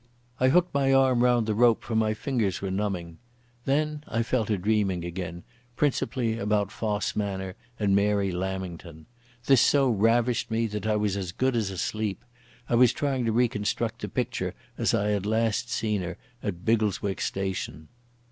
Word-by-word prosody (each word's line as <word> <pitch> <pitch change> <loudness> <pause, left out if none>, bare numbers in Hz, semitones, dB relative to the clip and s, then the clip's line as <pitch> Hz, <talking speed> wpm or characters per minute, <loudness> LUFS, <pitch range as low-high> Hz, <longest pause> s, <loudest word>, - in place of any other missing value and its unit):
I 130 - +4
hooked 180 +5 +3
my 135 -1 +2
arm 130 -2 +4
round 120 -2 +3
the 110 - 0
rope, 115 +1 +4
for 115 - -4
my 110 -1 +2
fingers 110 -7 -1
were 95 -1 -3
numbing. 95 -4 -3 0.5
Then 150 +2 0
I 115 - 0
fell 115 -1 0
to 105 -1 0
dreaming 95 -3 0
again, 85 -1 -5 0.3
principally 120 -5 0
about 105 -1 0
Fosse 105 -2 -2
Manor 95 -3 -3 0.2
and 100 -2 +2
Mary 100 -1 +2
Lamington. 90 -3 -5 0.4
This 135 -3 +5
so 140 -2 +4
ravished 115 +3 +2
me 115 +1 +1
that 105 0 -3
I 110 - +2
was 105 -2 0
as 95 -3 -3
good 130 +6 0
as 110 -4 0
asleep. 100 +3 -3 0.4
I - - -2
was 120 0 +5
trying 135 -4 -1
to 115 - +1
reconstruct 115 0 0
the - - -4
picture 110 -7 -2 0.2
as - - +1
I 105 +1 +1
had 100 -1 0
last 115 +2 0
seen 105 -4 -1
her 90 -1 -5 0.2
at 90 -4 -5
Biggleswick 105 -3 +1
station.... 95 -5 -3
105 Hz, 170 wpm, -27 LUFS, 95-120 Hz, 0.5 s, This